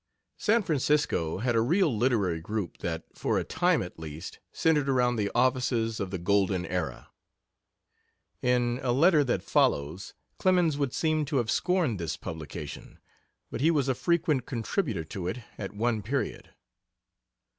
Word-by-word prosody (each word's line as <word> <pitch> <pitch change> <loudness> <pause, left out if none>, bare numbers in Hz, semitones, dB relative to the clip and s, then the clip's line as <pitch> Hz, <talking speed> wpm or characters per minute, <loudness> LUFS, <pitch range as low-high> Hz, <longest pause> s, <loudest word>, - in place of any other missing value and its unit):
San 225 +1 +3
Francisco 145 - +1
had 120 +3 0
a 115 - +4
real 160 - +2
literary 105 -8 +1
group 105 0 -4
that, 80 -1 -3
for - - -1
a - - 0
time - - +1
at - - -10
least, 80 0 -8
centered 150 -4 +2
around 125 -2 +2
the 105 -3 0
offices 120 -3 +1
of 95 - -2
the 95 - -3
Golden 95 0 +1
Era. - - -4 1.3
In 125 0 +1
a 125 -2 +1
letter 155 +3 +5
that 125 -3 -1
follows 80 +7 0 0.2
Clemens 180 -5 +3
would 140 -3 -1
seem 155 -1 +1
to 145 0 -1
have 120 -3 +1
scorned 175 - +1
this 85 -2 -3
publication, 80 -2 -7 0.5
but - - -4
he 155 - +4
was 145 -5 +2
a 130 - +2
frequent 155 -3 +1
contributor 120 - -2
to 85 +3 -5
it 95 - -2 0.2
at 100 - -4
one 110 0 0
period. 130 +7 -3
120 Hz, 155 wpm, -28 LUFS, 100-145 Hz, 1.3 s, letter